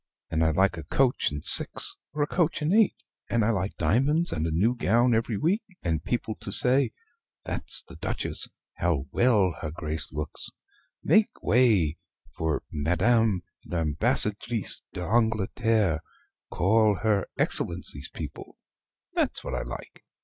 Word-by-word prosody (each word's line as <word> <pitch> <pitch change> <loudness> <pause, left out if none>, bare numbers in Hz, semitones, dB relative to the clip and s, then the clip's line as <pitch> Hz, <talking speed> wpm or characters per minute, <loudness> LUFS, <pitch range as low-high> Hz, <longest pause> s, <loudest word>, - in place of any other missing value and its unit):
and 80 0 +1
I 80 - +3
like 95 +3 +2
a 80 - -6
coach 130 -2 +1
and 75 0 -6
six - - +4 0.2
or 150 -1 -1
a - - -1
coach 165 -2 0
and 155 +5 +1
eight; 220 -1 +4 0.3
and 115 -2 +2
I 115 - +3
like 95 -1 -2
diamonds, 150 +8 +2
and 80 0 -1
a - - -2
new 100 +10 +2
gown 120 +2 +2
every 115 -1 0
week; 185 - +1 0.2
and 80 -3 -1
people 115 +2 -2
to 100 - -5
say 130 +6 +4 0.5
'That's - - -2
the - - -13
Duchess - - -1 0.3
How 80 -7 0
well 105 -8 +3
her 80 - -3
Grace 80 0 -5
looks 75 0 -4 0.5
Make 215 0 +2
way 105 -11 +3 0.4
for 80 -2 -1
Madame 95 +6 +2 0.2
l'Ambassadrice 100 - 0
d'Angleterre 110 -2 +1 0.5
Call 105 +3 +3
her 105 -3 +1
Excellency's - - -1
people' - - -8 0.6
that's - - -1
what - - -5
I - - -1
like. - - -9
105 Hz, 140 wpm, -27 LUFS, 85-120 Hz, 0.6 s, six